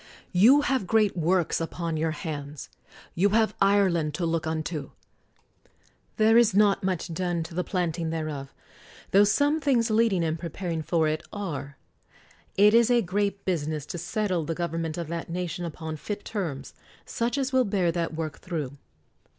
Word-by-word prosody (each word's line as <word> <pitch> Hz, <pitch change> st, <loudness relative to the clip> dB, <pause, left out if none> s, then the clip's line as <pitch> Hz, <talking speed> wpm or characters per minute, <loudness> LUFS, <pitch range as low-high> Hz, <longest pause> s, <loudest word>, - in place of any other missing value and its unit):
You 235 Hz, +11 st, +6 dB
have 265 Hz, -9 st, 0 dB
great 215 Hz, -1 st, +3 dB
works 175 Hz, 0 st, +1 dB
upon 165 Hz, 0 st, -3 dB
your 160 Hz, +1 st, 0 dB
hands. 150 Hz, -2 st, -6 dB, 0.4 s
You 195 Hz, +4 st, +3 dB
have 220 Hz, -1 st, +2 dB
Ireland 185 Hz, -6 st, +3 dB
to 170 Hz, -, -1 dB
look 165 Hz, -1 st, -1 dB
unto. 155 Hz, -2 st, -3 dB, 1.3 s
There 220 Hz, +1 st, +6 dB
is 220 Hz, -5 st, +3 dB
not 200 Hz, -1 st, +4 dB
much 185 Hz, -2 st, -2 dB
done 175 Hz, -1 st, -1 dB
to 165 Hz, +2 st, -10 dB
the 180 Hz, +2 st, -1 dB
planting 170 Hz, -3 st, -2 dB
thereof, 155 Hz, -4 st, -4 dB, 0.6 s
tho 200 Hz, +2 st, +6 dB
some 285 Hz, +9 st, +2 dB
things 245 Hz, -5 st, +2 dB
leading 215 Hz, -5 st, +3 dB
and 160 Hz, 0 st, -1 dB
preparing 170 Hz, 0 st, -4 dB
for 160 Hz, 0 st, +1 dB
it 155 Hz, +1 st, -1 dB
are. 145 Hz, -9 st, -5 dB, 0.8 s
It 205 Hz, +2 st, +6 dB
is 235 Hz, 0 st, +5 dB
a 240 Hz, -2 st, +4 dB
great 200 Hz, +2 st, -1 dB
business 155 Hz, -5 st, -2 dB
to 175 Hz, -, -6 dB
settle 185 Hz, -1 st, -1 dB
the 165 Hz, +2 st, -3 dB
government 165 Hz, -1 st, -3 dB
of 170 Hz, -2 st, -4 dB
that 170 Hz, 0 st, -4 dB
nation 175 Hz, 0 st, -3 dB
upon 160 Hz, -1 st, -6 dB
fit 205 Hz, +6 st, -6 dB
terms, 160 Hz, -11 st, -4 dB, 0.3 s
such 235 Hz, +2 st, -2 dB
as 265 Hz, -1 st, -1 dB
will 260 Hz, -1 st, +4 dB
bear 195 Hz, -6 st, +1 dB
that 165 Hz, -1 st, -2 dB
work 155 Hz, -2 st, -4 dB
through. 150 Hz, -6 st, -5 dB
175 Hz, 165 wpm, -26 LUFS, 160-205 Hz, 1.3 s, You